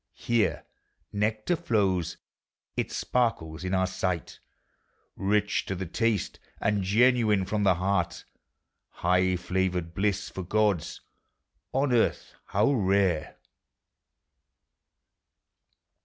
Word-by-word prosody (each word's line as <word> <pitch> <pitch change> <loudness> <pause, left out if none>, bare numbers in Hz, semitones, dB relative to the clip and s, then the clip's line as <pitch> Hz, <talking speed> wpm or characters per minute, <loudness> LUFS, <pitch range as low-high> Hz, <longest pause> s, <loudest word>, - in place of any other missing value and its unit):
Here 120 -2 0 0.5
nectar 110 +9 0
flows; 95 - 0 0.6
it - - -2
sparkles 90 -10 -1
in 95 +1 -1
our 95 0 +2
sight; 90 -2 -3 0.8
Kich 105 +1 +1
to 95 - -2
the 95 +1 -4
taste, 110 +2 -1 0.2
and 105 -1 +1
genuine 110 0 +3
from 105 +2 -1
the 95 -3 +4
heart: 90 -1 -1 0.8
Iligh 90 +1 +3
flavored 90 -1 -1
bliss 100 +1 0
for 95 - -5
gods! 100 -2 0 0.7
on 135 -1 +1
Earth 115 - +1
how 105 +7 +2
rare! 95 - +1
95 Hz, 95 wpm, -27 LUFS, 90-110 Hz, 0.8 s, the